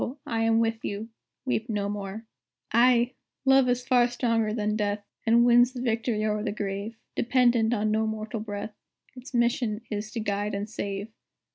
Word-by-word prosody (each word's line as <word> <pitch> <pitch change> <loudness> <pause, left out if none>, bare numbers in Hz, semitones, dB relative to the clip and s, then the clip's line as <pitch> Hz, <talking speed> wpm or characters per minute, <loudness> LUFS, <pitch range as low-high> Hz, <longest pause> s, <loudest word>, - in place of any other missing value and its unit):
I 225 -1 -1
am 225 0 +3
with 225 0 0
you 210 +3 -4 0.4
weep 240 -2 -1
no 205 -2 -1
more. 205 +2 -5 0.5
"Ay! 240 +1 +4 0.3
Love 270 -1 +5
is 245 0 +1
stronger 245 -1 +3
far 225 -3 +1
than 210 -1 -1
death, 205 -1 -1 0.2
And 235 +1 +5
wins 245 +1 +5
the 250 - -5
victory 225 -2 0
o'er 210 -1 0
the 210 -1 -2
Grave; 205 +2 -4 0.2
Dependent 240 -2 +3
on 215 -2 +1
no 220 +1 +1
mortal 220 +1 -4
breath, 210 0 -5 0.4
Its 250 0 -9
mission 235 -2 +1
is 210 +1 -3
to 235 - -2
guide 205 -1 -1
and 200 +1 -3
save. 200 -1 -4
225 Hz, 170 wpm, -27 LUFS, 210-240 Hz, 0.5 s, Love